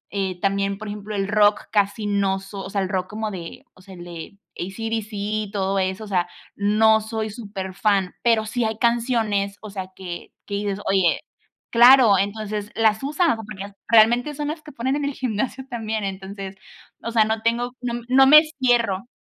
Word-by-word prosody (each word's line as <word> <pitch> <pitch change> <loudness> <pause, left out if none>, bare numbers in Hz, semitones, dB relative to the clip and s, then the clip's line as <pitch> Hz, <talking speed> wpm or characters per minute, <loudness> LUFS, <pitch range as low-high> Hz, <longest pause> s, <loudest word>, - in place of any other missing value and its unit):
Eh, 190 -2 -2
también, 195 +1 0
por 215 +2 -8
ejemplo, 210 +1 -6
el 195 -1 -1
rock 205 0 +3
casi 205 0 +1
no 200 -2 +1
soy, 195 +1 -8
o - - -7
sea, 200 0 -1
el 190 - -2
rock 185 -1 -1
como 215 0 -4
de, 170 -4 -8
o - - -20
sea, 190 0 -13
el 175 - -10
de 175 +2 -9 0.2
ACDC 225 +4 -4
y 210 0 -2
todo 195 -1 0
eso, 190 +3 -2
o - - -8
sea, 180 -3 0 0.3
no 220 +2 +4
soy 220 0 -4
superfan, 200 -2 -1
pero 230 -2 +3
sí 240 +2 -1
hay 220 -1 -1
canciones, 225 -4 0
o 215 -1 -9
sea, 190 -2 -5
que 175 -2 -8
que 200 - -8
dices: 200 -1 -2
"Oye, 190 -4 +2 0.5
claro". 240 -4 +7
Entonces 210 +1 -3
las 220 -2 +2
usas, 300 +1 +1
porque 205 -2 -8
realmente 240 +6 +4
son 295 0 -3
las 310 +1 -5
que 305 -1 -12
ponen 265 +1 -1
en 290 - -2
el 285 - -2
gimnasio 255 +2 -3
también, 220 -3 -3
entonces, 195 0 -6 0.5
o - - -4
sea, 225 -2 +4
no 220 0 -1
tengo 235 +2 0
no 240 -1 -3
no 265 +1 +6
me 305 +3 +9 0.2
cierro. 235 -5 +2
210 Hz, 190 wpm, -23 LUFS, 195-230 Hz, 0.5 s, me